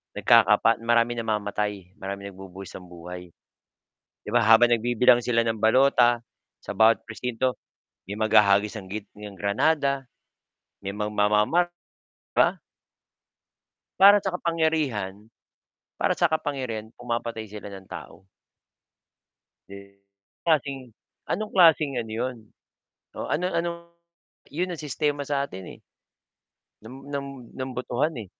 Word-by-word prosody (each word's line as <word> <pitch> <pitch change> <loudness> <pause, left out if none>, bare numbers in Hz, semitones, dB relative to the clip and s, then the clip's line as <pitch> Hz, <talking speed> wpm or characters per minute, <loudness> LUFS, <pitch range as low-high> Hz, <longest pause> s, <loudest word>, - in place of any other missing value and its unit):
Nagkakapat 115 -1 +4
maraming 120 0 +2
namamatay, 105 -3 -3
maraming 100 +1 -6
nagbubuwis 95 0 -11
ng 90 - -13
buhay. 90 0 -10 0.9
'Di - - -9
ba - - +3
habang 115 +2 +6
nagbibilang 120 +1 +4
sila 115 -1 +2
ng 115 -1 -1
balota, 120 +1 +4 0.4
sa - - -7
bawat 110 0 +5
presinto, 125 +3 -2 0.5
may 100 - -5
maghahagis 105 0 +3
ng 95 - -13
git 105 +1 -6
ng 105 -1 -10
granada. 140 +6 0 0.7
May 100 +1 -6
magmamamar 105 +10 +2 0.7
ba. - - +3 1.4
Para 200 +1 +8
sa 190 - -2
kapangyarihan, 155 - -1 0.8
para - - +1
sa 170 -2 +2
kapangyarihan 130 -8 -3
pumapatay 115 -2 -4
sila 105 -1 -9
ng 95 -1 -10
tao. 95 - -11 1.4
Si 100 0 -13 0.5
klaseng 135 -6 0 0.3
anong 215 +3 -3
klaseng 155 -7 +4
ano 115 - -5
'yon, 125 +3 -3 0.8
oo - - -4
ano 180 +5 -1
ano 170 -1 -1 0.8
'yon 180 +4 -1
ang 175 - -5
sistema 145 0 -2
sa 140 0 -1
atin 95 0 -9
eh. - - -25 1.0
Ng 130 +5 -12
ng 140 -1 -4 0.3
ng 130 0 -5
botohan 125 +4 -1
eh. 110 - -7
115 Hz, 120 wpm, -25 LUFS, 105-140 Hz, 1.4 s, Para